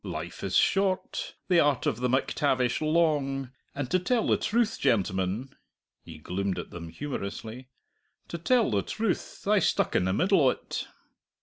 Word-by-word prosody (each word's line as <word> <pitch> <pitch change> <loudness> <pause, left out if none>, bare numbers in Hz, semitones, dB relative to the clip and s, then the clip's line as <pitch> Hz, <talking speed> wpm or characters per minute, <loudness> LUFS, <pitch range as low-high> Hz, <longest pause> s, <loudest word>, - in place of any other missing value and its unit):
"Life - - -6
is - - +1
short, 195 -1 +1
the 180 -2 +4
art 145 -4 +2
of - - 0
the 125 +1 0
MacTavish 130 -1 +1
long, 150 -5 +1 0.2
and 140 -2 -2
to 185 - +3
tell 225 +5 +1
the - - +3
truth, 225 0 0
gentlemen" 100 -1 0 0.5
he 80 -2 -11
gloomed 95 +4 -3
at 90 - -6
them 85 -1 -7
humorously 120 - -6 0.6
"to 170 - -6
tell 235 - +2
the 100 -2 +2
truth, 215 - -3
I 210 0 +5
stuck 165 - +1
in 90 - +3
the 95 - +1
middle 185 - +3
o't!" 130 -2 0
135 Hz, 160 wpm, -28 LUFS, -, 0.6 s, I